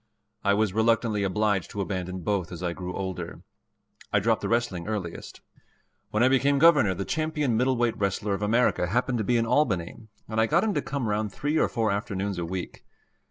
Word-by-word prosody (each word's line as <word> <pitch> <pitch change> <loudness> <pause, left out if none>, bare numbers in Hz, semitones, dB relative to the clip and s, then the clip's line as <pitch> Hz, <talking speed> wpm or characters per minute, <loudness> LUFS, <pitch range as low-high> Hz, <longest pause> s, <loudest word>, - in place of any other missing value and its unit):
I 100 0 +3
was 105 -2 +1
reluctantly 110 -1 +2
obliged 100 0 0
to 100 - -4
abandon 95 -1 -4
both 95 -2 -1
as 90 0 -7
I 85 -1 -1
grew 90 0 -6
older. 95 -2 -5 0.7
I - - +3
dropped - - +1
the - - -2
wrestling 115 -7 -1
earliest. 100 -6 -5 0.7
When 110 +2 +1
I - - +6
became 135 +2 +3
Governor, 145 - +5
the 100 - -4
champion 155 -5 -1
middleweight 120 -1 +1
wrestler 100 +1 0
of 100 - -3
America 105 -3 +2
happened 120 +5 0
to - - 0
be 120 +3 +2
in 115 - +1
Albany, 100 - +1 0.3
and 110 0 0
I 110 - +3
got 170 +7 +3
him 220 -2 +1
to - - 0
come 140 -5 -3
round 105 0 -1
three 145 +8 -1
or - - +2
four 110 -2 0
afternoons 100 -2 -2
a 85 - -2
week. 90 +1 -6
105 Hz, 200 wpm, -26 LUFS, 95-120 Hz, 0.7 s, I